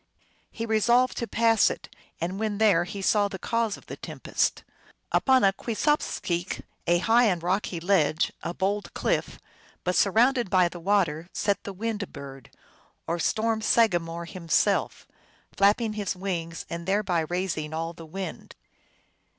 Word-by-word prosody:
He 230 - -5
resolved 235 +3 +3
to 235 - -2
pass 225 -1 +4
it, - - -6 0.3
and 180 +4 -3
when 215 -2 -1
there 200 -6 +4
he 195 +2 -6
saw 205 +1 +3
the 195 - -6
cause 230 +2 -1
of - - -17
the - - -8
tempest. - - -2 0.5
Upon 260 -3 +4
a 195 -1 +5
kwesopskeal? 215 - -1 0.2
a 175 - +4
high 230 +6 +4
and 180 -6 +1
rocky 185 -1 -1
ledge, 165 -3 +2
a - - -3
bold 200 +3 -2
cliff, - - -1 0.5
but 180 - 0
surrounded 235 +3 +3
by 180 -2 +4
the 175 - -9
water 175 -3 +1
sat 200 -2 0
the 200 - -4
Wind 210 0 -3
Bird, 135 -3 -10 0.6
or 170 +1 -2
storm 220 +4 0
sagamore 175 -7 +2
himself, 170 -2 0 0.5
flapping 215 +2 +3
his 205 -2 -2
wings, 170 -3 -4
and 170 +1 -6
thereby 195 -3 +1
raising 160 -2 -2
all 165 +1 -3
the 165 - -11
wind. 185 0 -7
195 Hz, 150 wpm, -26 LUFS, 170-220 Hz, 0.6 s, a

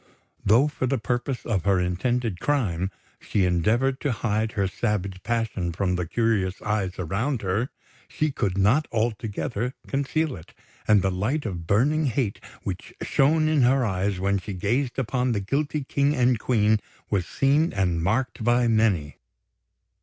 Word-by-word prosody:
Though 115 +8 +5
for 140 -3 -2
the 135 +1 +1
purposes 125 +2 -2
of 100 -7 0
her 100 -2 +3
intended 95 +3 -1
crime, 95 - 0 0.3
she 100 -3 0
endeavoured 115 +10 +1
to 145 - 0
hide 110 -1 -1
her 100 -3 +1
savage 95 -2 -2
passion 110 -5 -1
from 90 +1 0
the 90 -2 -2
curious 105 -3 0
eyes 100 -4 -1
around 105 - -2
her, 100 +7 0 0.4
she 155 -1 -1
could 100 -8 -1
not 110 +11 +3
altogether 115 +1 -2
conceal 140 +2 -1
it; 80 - -14 0.3
and 105 -3 +5
the 95 - +1
light 110 +11 -1
of 85 -6 -5
burning 145 - +2
hate 115 -6 -1 0.2
which 95 -2 -6
shone 155 +3 +3
in 155 -2 +3
her 130 +1 +4
eyes 95 -1 -1
when 100 +1 +1
she 100 +1 -6
gazed 120 +8 -1
upon 125 -1 0
the 105 - 0
guilty 145 +8 -1
King 140 +2 +1
and 125 -2 +3
Queen 110 -2 +2 0.3
was 95 -4 0
seen 145 +4 +2
and 90 -4 0
marked 110 +6 -1
by 120 +1 +3
many. 105 -10 +1
110 Hz, 160 wpm, -25 LUFS, 95-130 Hz, 0.4 s, Though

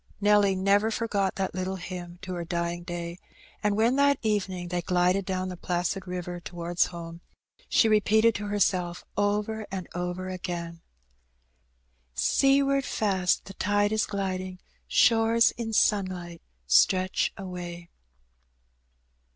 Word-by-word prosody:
If - - -35
Nelly 205 -2 +4
never 200 +3 +3
forgot 210 -4 -1
that 190 -1 -2
little 185 +1 -3
hymn 175 -1 -7
to 185 - -5
her 175 -1 -3
dying 170 0 -2
day; 175 0 -6 0.4
and 210 0 +1
when 235 +4 +3
that 280 -1 +4
evening 190 -5 -1
they 175 0 -1
glided 180 +2 +1
down 185 -1 -2
the 180 - -5
placid 180 +2 -2
river 180 -1 -5
towards 175 0 -1
home, 170 -1 -8 0.5
she 225 - +4
repeated 220 +1 +4
to 210 0 -4
herself 185 -4 0
over 210 +2 -1
and 190 -3 -5
over 180 +1 -3
again 175 -2 -5 0.7
— 65 0 -43 0.2
" - - -42
Seaward 275 - +3
fast 190 -7 0
the 195 - -9
tide 205 +2 +1
is 220 0 +1
gliding. 185 -2 -3 0.3
Shores 230 0 +4
in 230 -2 -5
sunlight 185 -5 0 0.2
stretch 185 - +3
away." 175 -2 -7
185 Hz, 135 wpm, -27 LUFS, 175-205 Hz, 0.7 s, Nelly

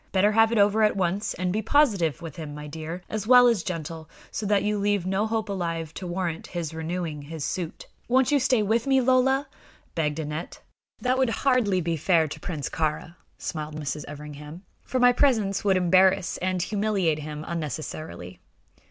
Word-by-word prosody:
Better 200 +2 +3
have 225 +1 +4
it 230 - +1
over 205 +1 +4
at 210 -2 +3
once; 190 +3 -1
and 180 0 -1
be 215 - 0
positive 200 - +2
with 160 -3 -7
him, 150 -3 -7
my 150 0 -7
dear, 160 +4 -6
as 215 0 -4
well 250 0 +8
as 230 -6 +3
gentle, 165 -3 -5 0.2
so 210 - -3
that 205 -1 +2
you 210 0 0
leave 200 -2 +1
no 195 +3 0
hope 220 0 -1
alive 165 -5 -3
to 185 - -6
warrant 175 -2 -3
his 170 -3 -4
renewing 160 -1 -4
his 155 +1 -6
suit." 175 -3 -4 0.2
"Won't 260 +3 +3
you 290 - +4
stay 255 -4 +2
with 225 +4 +1
me, 270 -1 +4
Lola?" 260 +2 +3 0.5
begged 150 -1 -1
Aneth. 155 +2 -5 0.4
"That 255 +1 +1
would 260 -2 +3
hardly 230 -7 +2
be 165 0 -1
fair 165 0 +3
to 155 - -7
Prince 155 -4 -4
Kāra," 160 +1 -2 0.2
smiled 155 -2 -5
Mrs. 150 0 -4
Everingham, 150 +3 -9 0.2
"for 255 - -2
my 245 0 +6
presence 225 -7 +2
would 195 -2 +3
embarrass 185 0 +3
and 185 -1 0
humiliate 200 -6 0
him 150 0 -6
unnecessarily. 155 - -5
185 Hz, 185 wpm, -26 LUFS, 160-215 Hz, 0.5 s, well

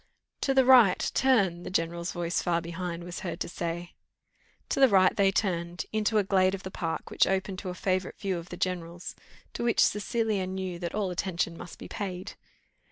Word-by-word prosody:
'" - - -55
"To 270 - +1
the 265 -1 +5
right, 245 -8 +7
turn," 200 -10 +3
the - - -6
general's 170 0 -1
voice 175 -1 -1
far 170 -1 +1
behind 170 0 -5
was 175 +1 -6
heard 175 - -5
to - - -1
say. 175 0 -4 0.8
To - - 0
the 270 - +8
right 190 -2 +5
they 195 -1 +4
turned, 175 -3 -1
into 215 0 +1
a 210 - +4
glade 190 -1 +3
of 195 - -10
the 190 - -6
park, 165 -2 -4
which - - +3
opened 190 0 -1
to 185 - -5
a 180 - -5
favourite 185 0 -1
view 190 -3 -2
of 170 +1 -11
the 175 - -7
general's, 175 -1 -3 0.4
to - - -4
which 235 -1 +1
Cecilia 210 -2 0
knew 185 -2 -4
that 170 +1 -4
all 200 -3 -1
attention 175 -2 -1
must 175 - -10
be - - -9
paid. 185 -3 -5
185 Hz, 205 wpm, -28 LUFS, 175-200 Hz, 0.8 s, the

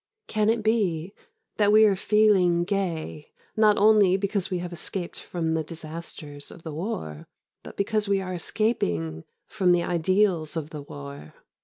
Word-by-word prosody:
Can 215 0 +1
it 225 -1 +1
be 195 -5 0 0.4
that 205 -1 +4
we 215 +1 +7
are 200 -2 +4
feeling 190 -4 +3
gay 175 -6 -3 0.2
not 215 -1 +4
only 205 -3 +5
because 195 -1 -1
we 185 - -1
have 175 0 -5
escaped 175 +1 -5
from 165 -2 -3
the 160 -1 0
disasters 155 -2 -8
of 170 - -13
the 160 - -6
war 145 - -5 0.3
but - - -12
because 210 +1 0
we 200 -1 +2
are 185 -1 -4
escaping 85 - -1 0.2
from 185 -4 +2
the 175 -1 +2
ideals 175 -2 +1
of 155 -1 -5
the 150 -3 -6
war? 70 - -10
180 Hz, 160 wpm, -26 LUFS, 160-205 Hz, 0.4 s, we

